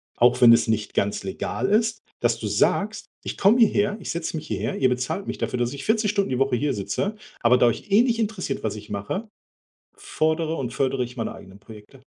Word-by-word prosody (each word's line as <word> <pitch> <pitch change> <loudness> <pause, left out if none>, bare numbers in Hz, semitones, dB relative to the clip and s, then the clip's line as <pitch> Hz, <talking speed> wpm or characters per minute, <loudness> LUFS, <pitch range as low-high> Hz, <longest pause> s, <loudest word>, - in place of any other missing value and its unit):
auch 125 +1 +4
wenn 120 -2 +8
es 115 - +3
nicht 110 -1 -1
ganz 100 0 -1
legal 95 - -3
ist, 220 +1 +2 0.2
dass - - +1
du - - -3
sagst: - - 0 0.2
„Ich - - -5
komme 210 +5 +4
hierher 205 -2 +3
ich - - -5
setze 165 -1 -3
mich 155 - -7
hierher, - - -3
ihr 130 - +3
bezahlt 125 +10 -2
mich - - -4
dafür, 125 - -2
dass 120 +2 -1
ich 140 - -7
40 220 -1 +1
Stunden 200 -2 0
die 125 - -1
Woche 135 -2 +2
hier 145 +3 0
sitze, 100 - -2 0.3
aber 120 +2 +5
da 125 - +4
euch 155 - -2
eh 205 - +6
nicht 235 -2 +1
interessiert, 205 -10 -2
was 105 -1 -2
ich 105 0 -11
mache, 105 - -4 0.7
fordere 160 - -1
und 125 -3 -4
fördere 135 -1 0
ich 125 +1 -10
meine 115 - -3
eigenen 95 +1 -13
Projekte.” 110 +5 -14
135 Hz, 220 wpm, -24 LUFS, -, 0.7 s, wenn